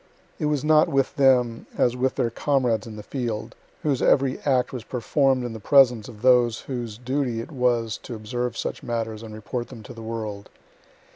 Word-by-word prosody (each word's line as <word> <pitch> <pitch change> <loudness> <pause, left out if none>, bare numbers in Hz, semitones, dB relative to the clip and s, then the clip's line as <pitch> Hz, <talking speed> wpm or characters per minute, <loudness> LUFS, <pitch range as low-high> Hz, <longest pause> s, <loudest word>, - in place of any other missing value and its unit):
It - - -1
was 150 -2 0
not 155 +1 +5
with 135 -3 +1
them 125 -4 +3
as 120 0 +2
with 130 +1 0
their 115 - 0
comrades 125 -5 0
in 110 - -8
the 105 - -8
field, 115 -3 -4 0.3
whose 140 -4 +1
every 135 -1 +3
act 130 -3 +1
was 125 -3 -5
perform'd 130 +2 +1
in 120 - -4
the 110 - -7
presence 125 -2 +4
of 110 -2 -12
those 120 -3 +4
whose 120 -5 -5
duty 125 -1 -1
it 115 - -7
was 120 -5 0
to 120 - -7
observe 120 +2 -3
such - - -3
matters 115 -2 -3
and 110 -1 -9
report 110 +3 -5
them 110 - -11
to 125 - -10
the 115 - -10
world. 110 -3 -5
120 Hz, 195 wpm, -24 LUFS, 115-130 Hz, 0.3 s, not